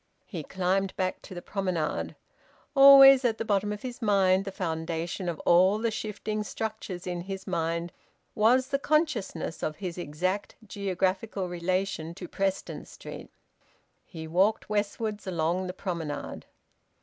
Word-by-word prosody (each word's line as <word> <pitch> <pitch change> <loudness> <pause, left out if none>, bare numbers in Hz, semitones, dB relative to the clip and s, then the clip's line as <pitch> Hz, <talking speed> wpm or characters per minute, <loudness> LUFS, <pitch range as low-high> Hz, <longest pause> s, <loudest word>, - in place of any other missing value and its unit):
He 175 -6 -6
climbed 190 +4 -1
back 185 -1 -2
to 185 - -10
the 175 - -7
promenade. 185 -6 -2 0.6
Always 275 -1 +9
at 230 -3 +1
the 225 - -3
bottom 205 -1 +1
of 210 0 -6
his 250 -1 -6
mind, 195 -3 +3
the 195 - -4
foundation 165 0 -3
of 165 - -4
all 185 +4 +5
the 225 +1 0
shifting 215 0 -3
structures 210 -4 -5
in 175 -1 -3
his 195 +1 -6
mind, 170 -1 -2 0.4
was 245 +5 +3
the 275 - 0
consciousness 280 - 0
of 155 - -2
his 180 -3 -5
exact 180 +6 -2
geographical 195 0 -1
relation 175 -1 -2
to 180 -1 -7
Preston 195 +1 -2
Street. - - -10 0.7
He 160 -2 -9
walked 195 +6 +1
westwards 210 0 -2
along 175 +1 0
the - - -3
promenade. 170 -5 -5
190 Hz, 140 wpm, -28 LUFS, 175-210 Hz, 0.7 s, Always